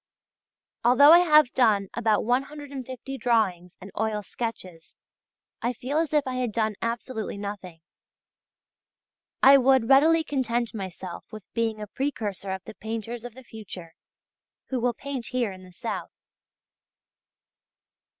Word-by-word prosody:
Although 255 +5 +7
I 340 - +9
have 305 -6 +5
done 210 -6 +3
about 220 -3 +1
150 270 0 -3
drawings 190 -8 0
and 195 +1 -11
oil 215 -1 -1
sketches 185 -7 -7 0.7
I 240 +2 0
feel 265 +6 -2
as 325 -2 -1
if 300 -2 +2
I 255 -1 -3
had 250 -3 -1
done 220 0 0
absolutely 230 -2 -3
nothing. 200 -5 -7 1.6
I 275 +1 +9
would 260 -2 +3
readily 320 +4 +5
content 240 -5 -1
myself 190 -3 -7
with 215 -2 -9
being 225 -2 -1
a 210 - -5
precursor 210 -5 -4
of 190 -1 -5
the 220 - -10
painters 225 +2 -6
of 245 -2 -9
the 260 - -12
future 195 -8 -10 0.8
who 260 - -1
will 240 0 0
paint 270 -3 -5
here 245 -5 -1
in 185 0 -11
the 185 - -14
south. 175 - -5
235 Hz, 135 wpm, -26 LUFS, 210-260 Hz, 1.6 s, I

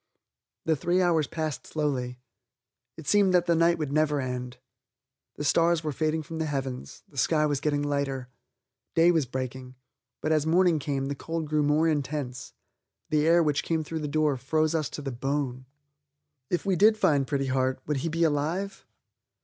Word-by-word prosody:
The 160 - +3
three 175 +5 +1
hours 170 -4 +2
passed 155 -3 -4
slowly. 130 -5 -2 0.8
It 160 - -9
seemed 200 -1 +4
that 175 - +4
the 170 - +3
night 170 +1 +3
would 150 -3 -3
never 150 -1 +2
end. 125 -1 -4 0.8
The - - -5
stars 165 +2 +3
were 155 - -1
fading 155 +2 -1
from 160 +2 -7
the 160 - -1
heavens, 135 -3 -5
the 145 -8 -6
sky 155 +1 +3
was 145 -2 0
getting 145 -1 0
lighter. 140 -3 -2 0.7
Day 165 +1 +6
was 160 -6 +1
breaking. 130 0 -5 0.4
But 155 - -1
as 155 -1 +2
morning 175 -1 +4
came 140 -1 -2
the 140 - -2
cold 160 +2 -4
grew 150 0 +1
more 150 +2 +3
intense; 140 -4 -3 0.6
the 155 0 +3
air 170 +1 +5
which 150 -2 +1
came 160 -1 -1
through 160 +1 -4
the 150 - -3
door 150 -1 +1
froze 155 +5 0
us 155 -4 0
to 150 - -7
the 135 - -3
bone. 130 0 -3 0.8
If 175 - -1
we 195 -2 +2
did 215 +5 +5
find 140 -9 +2
Pretty 140 -1 0
Heart, 130 0 0
would 150 -1 -1
he 165 +5 -2
be 165 +1 0
alive? 165 +6 -1
150 Hz, 180 wpm, -27 LUFS, 135-165 Hz, 0.8 s, Day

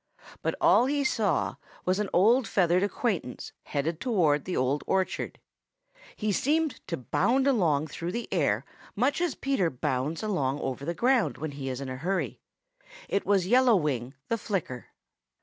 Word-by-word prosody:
But - - -1
all 250 - +5
he 285 +1 +1
saw 220 -6 0 0.3
was 185 +2 +1
an 210 -2 -1
old 225 +7 +4
feathered 180 -1 +3
acquaintance 200 - -2
headed 155 +3 -2
towards 170 - +2
the 185 - -2
Old 130 +3 +1
Orchard. 190 -1 -1 0.8
He 215 -1 -1
seemed 305 - +1
to 170 - -2
bound 235 - +1
along 170 - +2
through 170 +3 -5
the 235 0 -3
air 140 - +1 0.3
much 265 +9 +1
as 350 - 0
Peter 270 -11 0
bounds 145 - -2
along 145 -10 0
over 135 0 -4
the 170 +2 -2
ground 250 +3 +2
when 155 -1 -4
he 140 -1 -5
is 130 -1 -4
in 135 - -5
a 130 0 -5
hurry. 185 +8 -2 0.7
It 200 - -1
was 195 -3 +3
Yellow 245 +3 +5
Wing 135 -6 -1
the 230 - -1
Flicker. 175 - -3
180 Hz, 165 wpm, -28 LUFS, 145-230 Hz, 0.8 s, all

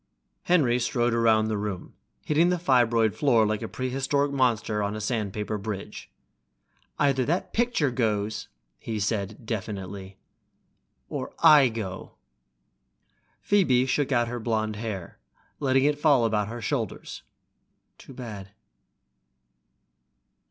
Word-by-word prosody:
Henry 135 -9 +3
strode 120 0 0
around 110 -2 +3
the 110 -2 -1
room, 100 -3 -5 0.3
hitting 160 +3 +3
the 180 - +1
fibroid 120 -8 +3
floor 120 -7 +3
like 105 0 -1
a 115 - -4
prehistoric 135 +3 -1
monster 115 -5 +1
on 100 +1 -2
a - - -4
sandpaper 105 -1 -2
bridge. 100 -1 -6 0.9
"Either 140 -3 +2
that 170 +8 -2
picture 230 - +1
goes," 105 -3 -1 0.3
he 110 -2 -4
said 100 -1 -1
finally, 115 - -18
definitely, 100 -3 -5 0.9
"or - - -6
I 150 -5 +8
go!" 100 -5 -6 1.3
Phoebe 140 -12 +3
shook 140 +2 0
out 120 -2 +2
her 120 +1 -4
blonde 110 -2 -1
hair, 105 -6 -6 0.4
letting 135 -2 +2
it 145 0 +1
fall 145 -6 +4
about 105 -2 0
her 115 +1 -7
shoulders. 120 -9 -3 0.8
"Too - - -13
bad." 105 -6 -8
115 Hz, 125 wpm, -26 LUFS, 105-135 Hz, 1.3 s, I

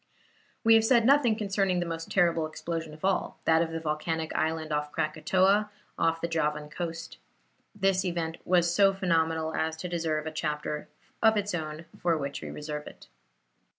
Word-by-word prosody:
We 225 - +6
have 225 0 +6
said 235 0 +4
nothing 265 -4 +5
concerning 195 -3 0
the 175 - -1
most 165 -1 -5
terrible 170 -4 +2
explosion 165 0 -5
of 155 - -6
all, 195 -1 0
that 160 0 +4
of 165 - 0
the 165 0 -4
volcanic 160 +1 -2
island 160 0 -1
of 150 0 -1
Krakatoa, 190 +8 +2 0.3
off 165 0 +1
the 170 - 0
Javan 150 -2 -1
coast. 165 0 -6 0.6
This 195 -2 +2
event 170 -3 -2
was 175 -1 +3
so 195 +1 +4
phenomenal 160 -3 +1
as 160 0 -1
to 180 - -5
deserve 160 -3 -1
a 160 - -3
chapter 150 -1 -3 0.3
of 220 -1 +5
its 205 -1 -1
own, 155 -1 -4 0.2
for 170 -2 +2
which 140 -1 -4
we - - -6
reserve 150 0 -6
it. - - -13
165 Hz, 175 wpm, -28 LUFS, 155-190 Hz, 0.6 s, We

